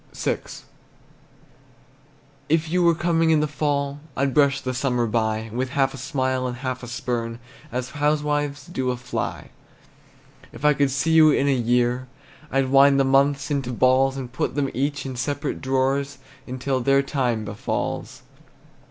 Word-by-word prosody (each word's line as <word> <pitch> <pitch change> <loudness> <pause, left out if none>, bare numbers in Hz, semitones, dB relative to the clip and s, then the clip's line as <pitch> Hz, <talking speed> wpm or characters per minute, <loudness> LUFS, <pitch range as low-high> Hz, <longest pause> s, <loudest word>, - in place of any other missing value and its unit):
VI. - - -1 2.1
If 160 0 +1
you 180 +1 +2
were 170 -1 +4
coming 165 -1 +1
in 160 -1 +4
the 150 - +2
fall, 145 -1 -1 0.2
I'd 135 0 +1
brush 140 -1 +3
the 130 -1 -3
summer 125 -2 0
by 110 -1 -1
With 130 +2 -2
half 135 -1 +1
a - - -8
smile 130 -1 -1
and 125 -1 -5
half 130 -1 -4
a 120 - -8
spurn, 115 -1 -3 0.3
As 125 0 -3
housewives 145 -1 0
do 130 -7 -3
a 125 - -1
fly. 125 0 -5 1.0
If 150 - -7
I 150 - +6
could 140 -1 +2
see 140 +4 0
you 160 -1 +7
in 140 -1 +2
a 140 - +4
year, 125 +1 +1 0.4
I'd 135 0 +1
wind 140 +1 +6
the - - +5
months 140 +1 +2
in 140 -1 +1
balls, 130 +2 +2
And 125 -3 -6
put 130 - -2
them 140 -2 0
each 140 +2 -2
in 130 -2 -5
separate 145 +3 -3
drawers, 135 +1 0 0.3
Until 130 +1 -2
their 135 +2 +3
time 125 -6 -1
befalls. 105 0 -4
135 Hz, 160 wpm, -23 LUFS, 125-145 Hz, 2.1 s, you